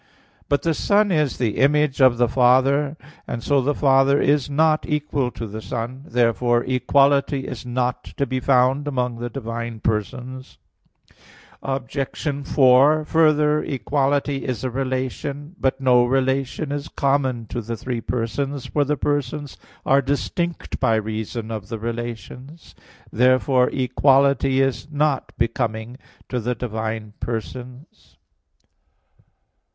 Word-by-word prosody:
But 145 - +1
the 165 - +1
Son 205 +5 +2
is 150 -5 +1
the 115 -4 -1
image 145 0 +2
of 130 -2 +6
the 120 0 +3
Father; 135 +4 +3 0.3
and 115 - -5
so 140 -2 +2
the 145 +3 0
Father 135 0 +4
is 145 -1 +2
not 155 +2 +2
equal 145 -3 -1
to 115 - -7
the 110 +1 -7
Son. 120 +5 -5
Therefore 120 0 +2
equality 140 +2 +2
is 125 -2 -7
not 125 0 -1
to 140 - +1
be 130 0 -2
found 130 +2 +2
among 125 -4 -2
the 120 0 -4
divine 115 -2 -5
persons. 125 +5 -4 1.0
Obj. 135 0 -4 0.5
4: 140 +4 +4
Further, 150 -1 +3
equality 140 +2 -1
is 125 -3 -3
a 130 - -2
relation. 135 +4 -4
But 135 0 0
no 125 -2 +4
relation 135 +3 0
is 145 0 -3
common 135 -4 0
to 120 - -3
the 115 +1 -5
three 120 0 -4
persons; 125 +4 -3
for 145 - 0
the 145 +1 -1
persons 145 +1 -2 0.3
are 135 +1 +4
distinct 165 +5 -3
by 120 -4 +2
reason 110 +1 -4
of 105 -2 -6
the 115 - -4
relations. 120 +6 -7 0.4
Therefore 130 +1 +3
equality 135 0 +2
is 135 +1 -1
not 150 -2 0
becoming 115 0 -2 0.3
to 125 - -2
the 120 +2 -2
divine 110 -2 -4
persons. 125 - -7
130 Hz, 130 wpm, -22 LUFS, 120-140 Hz, 1.0 s, of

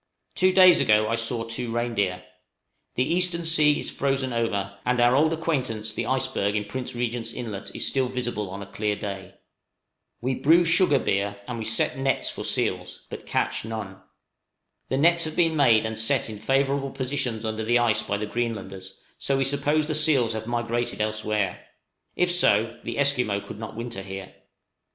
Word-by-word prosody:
Two 185 0 +3
days 185 -2 +7
ago 105 0 +3
I - - 0
saw 115 0 -1
two 115 +1 -3
reindeer. 110 -6 -1 0.7
The 125 - +2
eastern 170 +2 0
sea 155 -2 +4
is - - -3
frozen 135 -2 -1
over, 100 -4 -2
and 125 0 0
our 120 +1 +4
old 155 +3 +3
acquaintance 130 -10 -2
the - - -3
iceberg 130 -6 0
in 105 0 -1
Prince 125 +4 -6
Regent's 120 -1 -2
Inlet 110 -5 -6
is - - -1
still 130 -2 +1
visible 120 -5 -3
on 100 +2 -7
a - - -9
clear 105 +1 -2
day. 95 -2 -7 0.8
We 130 +2 -1
brew 165 +6 +4
sugar 170 -3 +4
beer, 100 -3 -1
and 120 -2 -5
we 110 - -4
set 115 +4 +1
nets 135 0 0
for - - -7
seals, - - -1
but - - -8
catch - - -1
none. 110 -4 -6 0.9
The 130 - 0
nets 170 +3 +4
have 155 - -5
been 165 -2 +2
made 120 -7 +4
and 110 0 -2
set 110 0 +1
in 105 - -8
favorable 135 +4 0
positions 130 -4 -3
under 110 0 -3
the 120 +2 +3
ice 120 -2 +2
by 100 - -2
the 105 - -3
Greenlanders, 100 -4 -5 0.2
so 135 - 0
we 135 - +1
suppose 145 +3 +1
the 155 - -2
seals 145 -7 +3
also 110 - -2
have 110 - -10
migrated 120 0 -2
elsewhere; 105 -3 -2 0.5
if 180 0 +2
so, 115 -9 +3
the - - -5
Esquimaux 125 -8 +1
could 105 - -10
not 110 - -7
winter 115 -3 -5
here. 95 -1 -8
120 Hz, 185 wpm, -25 LUFS, 110-140 Hz, 0.9 s, days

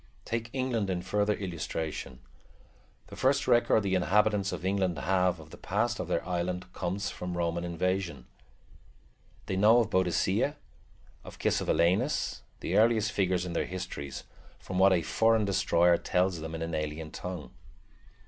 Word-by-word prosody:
Take 115 0 -3
England 125 -6 -1
in 90 -1 -2
further 105 +2 +1
illustration. 80 -7 -5 0.9
The - - -9
first 140 +2 +2
record 120 -3 +4
the 95 -1 -1
inhabitants 100 +2 +2
of - - -5
England 95 -3 0
have 90 +3 +1
of 80 0 -13
the - - -12
past - - -1
of - - -3
their - - -1
island 90 0 -2
comes 95 +3 -3
from 90 -1 -5
Roman 85 0 -1
invasion. 90 -3 -2 1.2
They 95 - -2
know 105 +5 +6
of 115 -3 +2
Boadicea, 95 - +1 0.7
of - - -11
Cassivelaunus, 85 +3 +1 0.2
the - - 0
earliest 110 -1 +3
figures 90 -2 0
in 90 - -5
their - - -1
history, 90 -6 -5 0.5
from 95 0 -4
what 95 +1 +6
a 90 -3 +2
foreign 110 +5 +3
destroyer 90 -3 +3
tells 90 -1 0
them 80 +1 -6
in 80 - -4
an 85 0 -4
alien 75 0 -3
tongue. 90 -4 -6
95 Hz, 150 wpm, -29 LUFS, 85-105 Hz, 1.2 s, know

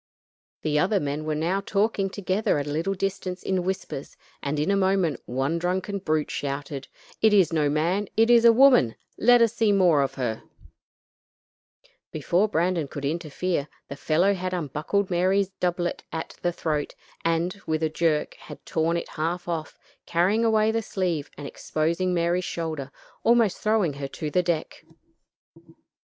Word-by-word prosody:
The 150 -1 +1
other 195 +5 +2
men 145 0 -3
were 155 -1 -1
now 175 +6 0
talking 200 -1 0
together 195 -1 0
at 145 - -2
a 145 - -4
little 165 +6 -1
distance 190 -1 -3
in 190 -2 0
whispers, 185 -7 -5 0.2
and 145 +1 -2
in 155 +6 +1
a - - +3
moment 190 -7 +1
one 135 +7 -1
drunken 185 +3 -2
brute 155 -4 -1
shouted: 140 -1 -4 0.3
"It 220 -1 +5
is 190 -5 +4
no 150 -2 +2
man; 170 +7 0
it 225 +2 +5
is 235 -1 +6
a 235 - +8
woman; 245 - +5 0.2
let 245 0 +6
us 230 -1 +2
see 225 -3 +2
more 180 -7 +4
of 135 - -1
her." 120 -4 -2 1.7
Before 175 +7 +1
Brandon 170 -4 0
could 140 0 -6
interfere, 160 0 -2 0.2
the 140 - -5
fellow 170 +7 +2
had 185 -1 -3
unbuckled 175 +5 -2
Mary's 185 +2 +2
doublet 175 -1 -1
at 160 - -5
the 175 - +1
throat, 155 -4 -2 0.3
and 170 +4 0
with 160 0 0
a 160 - +2
jerk, 155 -1 0
had - - -13
torn 165 +1 0
it 170 - -5
half 170 +3 -3
off, 165 -2 -4 0.3
carrying 190 +7 +2
away 220 -1 +3
the 225 0 0
sleeve 180 -8 -2
and 145 - -7
exposing 165 +6 -1
Mary's 175 +1 +1
shoulder, 160 -6 -4 0.3
almost 230 -4 +3
throwing 215 -8 +1
her 140 0 -5
to 150 +2 -5
the 180 - +3
deck. 170 -3 -3
175 Hz, 165 wpm, -25 LUFS, 155-195 Hz, 1.7 s, a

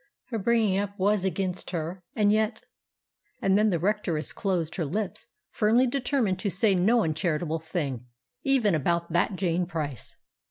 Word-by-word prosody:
Her 230 -3 -2
bringing 215 -2 +2
up 200 0 -4
was 200 0 +2
against 185 0 -2
her. 175 +1 -4
And 205 -1 +3
yet——" 215 +1 0 0.8
And 195 0 +2
then 215 +1 +4
the 175 - +1
Rectoress 175 -4 -1
closed 175 -5 -1
her 170 - 0
lips 205 +8 -3 0.2
firmly 225 +4 +3
determined 245 -6 0
to 200 - -1
say 195 +2 +2
no 215 +6 +3
uncharitable 160 0 -1
thing, 145 -7 -4 0.3
even 255 -8 +3
about 170 +2 0
"that 175 +3 +2
Jane 180 -1 0
Price." 150 - -5
190 Hz, 155 wpm, -27 LUFS, 170-215 Hz, 0.8 s, then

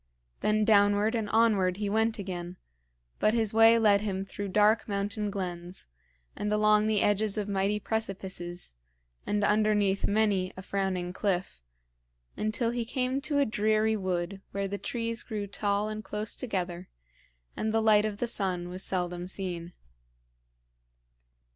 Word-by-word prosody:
Then 215 0 +1
downward 205 +1 +4
and 220 -3 -2
onward 205 -5 +3
he 205 0 -2
went 220 +2 +1
again, 180 -3 -6 0.6
but 215 +2 +2
his 220 -3 +1
way 225 +1 +7
led 205 -3 +4
him 195 -2 -3
through 200 +1 -5
dark 210 +3 +3
mountain 205 +1 -2
glens, 180 -2 -5 0.5
and 210 0 -3
along 210 0 +3
the 215 -2 +2
edges 205 0 +2
of 210 -1 -2
mighty 200 +1 0
precipices, 190 - -4 0.5
and 205 0 0
underneath 210 -2 +2
many 200 -3 +1
a 190 - -7
frowning 190 -3 -2
cliff, 185 - -2 0.7
until 220 +2 0
he 240 0 -2
came 255 +3 -1
to 295 0 -1
a 285 - +4
dreary 215 0 +1
wood 185 -1 -3
where 200 0 -1
the 200 +1 -5
trees 230 -1 -1
grew 210 -3 -4
tall 200 +1 -1
and 215 0 -5
close 210 0 -3
together 180 -6 -3 0.7
and 220 - -1
the 225 - +2
light 215 -1 +4
of 215 -1 -3
the 240 - -1
sun 185 -6 -1
was 185 +1 -5
seldom 180 -2 0
seen. 180 -3 -4
205 Hz, 150 wpm, -29 LUFS, 190-220 Hz, 0.7 s, way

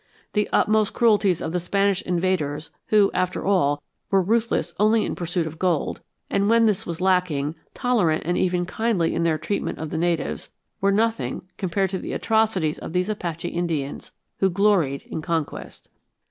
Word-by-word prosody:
The 210 -1 +1
utmost 215 -1 +2
cruelties 210 -6 +3
of 160 - -3
the 180 - 0
Spanish 195 +2 +1
invaders 170 -4 -1 0.2
who, 210 -2 +4
after 185 0 -1
all, 145 -7 +2 0.3
were 195 -1 +3
ruthless 225 +4 0
only 215 +1 +4
in - - -2
pursuit 175 0 -2
of 160 0 -7
gold, 175 -5 0 0.3
and, 200 +1 +1
when 230 0 +5
this 210 -4 0
was 170 0 -4
lacking, 180 -6 +1 0.2
tolerant 205 -11 +1
and 175 +2 0
even 180 -1 +1
kindly 205 -3 0
in - - -1
their 165 -2 +2
treatment 160 +7 -3
of 155 -1 -5
the 160 - -2
natives, 170 -1 -1 0.3
were 200 +1 +3
nothing 225 +3 0
compared 190 0 0
to 190 - -2
the - - -5
atrocities 220 -8 +1
of - - -7
these 180 +2 0
Apache 175 -5 -3
Indians, 160 -5 -3 0.3
who 195 - +3
gloried 180 -8 +2
in 160 - -6
conquest. 160 -3 -4
180 Hz, 170 wpm, -24 LUFS, 165-205 Hz, 0.3 s, when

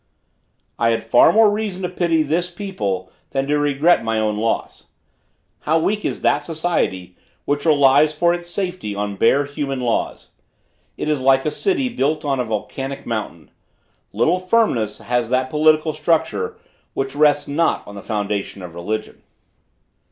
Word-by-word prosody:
I 115 - +3
had 115 0 0
far 120 +2 +5
more 220 -1 +5
reason 205 -3 -3
to 180 - -1
pity 170 -3 +1
this 170 +4 -1
people 100 - -4 0.2
than 135 0 -1
to 150 +1 +1
regret 145 +4 +3
my 115 0 -1
own 105 -1 0
loss. 115 +2 -3 0.7
How 155 +2 +1
weak 205 +6 0
is - - -3
that - - +3
society 145 - -2 0.3
which 145 +2 -1
relies 145 0 +5
for 170 +3 +2
its 175 0 -5
safety 180 - -4
on 100 0 -3
bare 135 +8 +3
human 140 -2 -4
laws. 120 -2 -2 0.7
It - - -3
is 150 -3 0
like 135 0 +3
a 150 - 0
city 335 - 0
built 155 - -1
on 135 -2 0
a 125 - 0
volcanic 135 +5 -5
mountain! 105 -8 -5 0.6
Little 140 - +2
firmness 185 - +1
has 120 -1 -1
that 130 +1 0
political 155 +1 +3
structure 165 +1 0 0.4
which 135 0 -2
rests 145 -1 +3
not 160 +4 0
on 100 - -10
the 100 - -8
foundation 105 -3 -3
of 90 -2 -9
religion. 90 +6 -5
145 Hz, 160 wpm, -20 LUFS, 115-165 Hz, 0.7 s, far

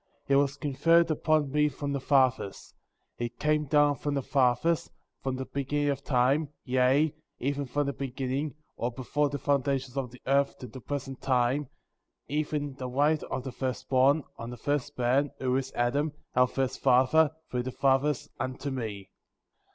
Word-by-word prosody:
^ - - -45
3. 140 - +1
It - - +6
was 140 0 0
conferred 165 +4 +3
upon 155 -2 +1
me 150 +1 +3
from 145 +1 -4
the 140 - -1
fathers; 130 -6 +1 0.5
it 120 0 -4
came 150 0 +1
down 145 0 +4
from 145 +1 -2
the 140 - -1
fathers,^ 135 +6 +2 0.3
from 130 -1 -2
the 130 +1 -4
beginning 140 +2 -1
of 140 0 -2
time, 135 +3 +2
yea, 130 +4 +3 0.2
even 140 +2 -2
from 145 +3 0
the 140 - -2
beginning, 135 +2 -3 0.2
or 120 - -1
before 140 +4 -1
the 145 - -3
foundations 135 -2 0
of 135 -2 -2
the 125 +1 -14
earth 140 +1 +2
to - - -8
the 125 +2 -10
present 135 0 -5
time, 130 +2 +1 0.6
even 145 -1 -2
the 130 -2 -4
right 145 +4 +2
of 130 - -4
the 130 - -5
first 130 0 -4
born, 135 +3 +4
on 115 - -6
the 125 - -7
first 145 +2 -2
man,^' 130 +4 +2
who 130 -1 0
is 135 0 -1
Adam,'^ 140 +5 0 0.2
our 125 0 +5
first 130 0 -2
father, 140 +5 +4 0.2
through 125 - 0
the 130 +1 -4
fathers, 135 +2 +1
unto 130 +2 -3
me. 105 -7 -5
135 Hz, 180 wpm, -28 LUFS, 130-145 Hz, 0.6 s, It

